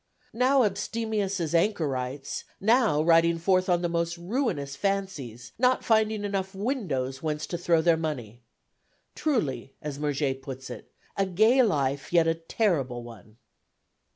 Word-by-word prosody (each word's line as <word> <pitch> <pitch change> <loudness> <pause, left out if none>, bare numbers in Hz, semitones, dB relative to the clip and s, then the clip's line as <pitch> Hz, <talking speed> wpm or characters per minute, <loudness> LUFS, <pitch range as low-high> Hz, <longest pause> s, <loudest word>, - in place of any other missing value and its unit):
Now 255 +3 +4
abstemious 210 -1 -1
as 165 -2 -2
anchorites, 145 -8 -1 0.2
now 220 - +3
riding 165 0 +4
forth 185 +2 +2
on 175 0 +2
the - - +2
most 170 0 -1
ruinous 170 - -2
fancies, 175 - -3
not 255 +1 +2
finding 220 -2 +2
enough 195 -1 -3
windows 190 - -2
whence 150 -1 -2
to - - -5
throw 170 -2 +2
their 170 -1 +4
money. 125 -8 -5 0.7
Truly, 140 - -2
as 145 -2 -6
Murger 145 -2 0
puts 130 -1 -8
it, - - -10 0.2
a 195 -1 +1
gay 220 +8 +4
life 140 - 0
yet 170 -2 +4
a 165 - +3
terrible 165 - -1
one! 115 -2 -13
170 Hz, 140 wpm, -27 LUFS, 140-205 Hz, 0.7 s, Now